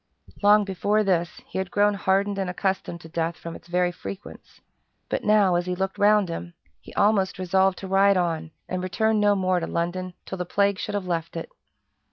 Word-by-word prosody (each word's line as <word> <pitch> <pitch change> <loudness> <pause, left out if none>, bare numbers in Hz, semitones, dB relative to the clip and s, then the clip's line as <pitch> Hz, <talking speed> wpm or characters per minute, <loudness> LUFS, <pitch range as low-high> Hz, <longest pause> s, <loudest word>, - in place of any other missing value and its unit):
Long 210 +1 +6
before 200 +3 +1
this, 175 -3 0
he - - -5
had 190 -1 -3
grown 205 +1 +3
hardened 200 +1 +1
and 190 -2 -1
accustomed 185 -2 -2
to - - -11
death 165 0 -2
from 170 0 -8
its - - -13
very 180 0 +1
frequence; 190 +3 -10 0.5
but - - -2
now, 210 -3 +4
as 175 +1 0
he 180 - -1
looked 190 +1 -3
round 210 -1 +4
him, 170 +1 -6 0.2
he - - -14
almost 200 -2 +2
resolved 190 +1 +2
to 195 - -7
ride 195 +1 +4
on 165 -3 -1 0.2
and 185 0 -3
return 220 +4 +1
no 205 -1 +4
more 185 -2 +1
to 165 - -4
London 175 +2 -3
till 190 - -6
the - - 0
plague 200 +2 +1
should 205 - -3
have 200 -2 -2
left 170 -2 -3
it. 165 - -6
190 Hz, 205 wpm, -25 LUFS, 175-200 Hz, 0.5 s, Long